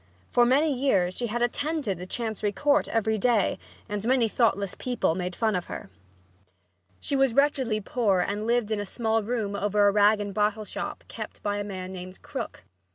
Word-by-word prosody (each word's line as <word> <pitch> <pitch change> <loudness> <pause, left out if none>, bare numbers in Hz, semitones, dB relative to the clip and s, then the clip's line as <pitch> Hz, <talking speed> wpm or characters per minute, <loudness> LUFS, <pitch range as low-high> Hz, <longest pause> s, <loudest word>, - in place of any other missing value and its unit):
For 240 -1 +5
many 285 +4 +3
years 200 -9 +1
she 240 - -2
had 240 +2 -1
attended 285 - -1
the 180 - -7
Chancery 220 -1 -2
Court 290 +7 +2
every 220 -1 +1
day 230 -3 +2 0.3
and 205 -1 -3
many 245 0 +3
thoughtless 205 -4 +1
people 245 -9 0
made 180 0 -3
fun 220 -3 +1
of 180 - -2
her. - - -7 1.1
She 280 - -1
was 270 -3 +3
wretchedly 265 -6 +2
poor 210 -3 +1
and 205 +4 -1
lived 235 -2 +1
in 215 - 0
a 205 - -3
small 225 +1 0
room 215 -2 -2
over 205 0 +2
a - - +5
rag 210 +1 +4
and 205 -1 -4
bottle 210 +1 0
shop - - -5
kept - - -8
by 205 -1 0
a 205 - -2
man 185 -2 -6
named 185 0 -9
Krook. - - -6
215 Hz, 190 wpm, -27 LUFS, 200-245 Hz, 1.1 s, For